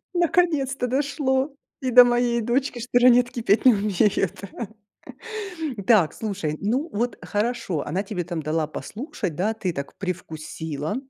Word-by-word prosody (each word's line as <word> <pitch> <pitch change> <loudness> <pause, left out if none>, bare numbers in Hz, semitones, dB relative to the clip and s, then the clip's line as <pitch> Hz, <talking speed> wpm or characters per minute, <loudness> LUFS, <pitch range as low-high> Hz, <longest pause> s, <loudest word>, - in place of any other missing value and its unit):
Наконец-то 310 -7 +2
дошло 270 +1 0 0.3
и 260 - 0
до 250 0 +9
моей 240 -1 +2
дочки, 245 +2 0
что 245 +1 +2
"Ранетки" 245 -1 +4 0.2
не 255 - +8
умеют, 200 -2 +1
да. 235 - -5 1.1
М, 195 - -5
так, 205 -10 +5
слушай, 195 -8 -3
ну, 250 +10 0
вот 235 +4 -1
хорошо, 205 - -1
она 180 +6 -1
тебе 195 -3 -4
там 170 -2 -4
дала 155 +1 0
послушать, 205 - -5
да, 210 +6 0
ты 195 -5 -2
так 140 -2 -6
привкусила 160 -2 -4
220 Hz, 140 wpm, -24 LUFS, 180-250 Hz, 1.1 s, до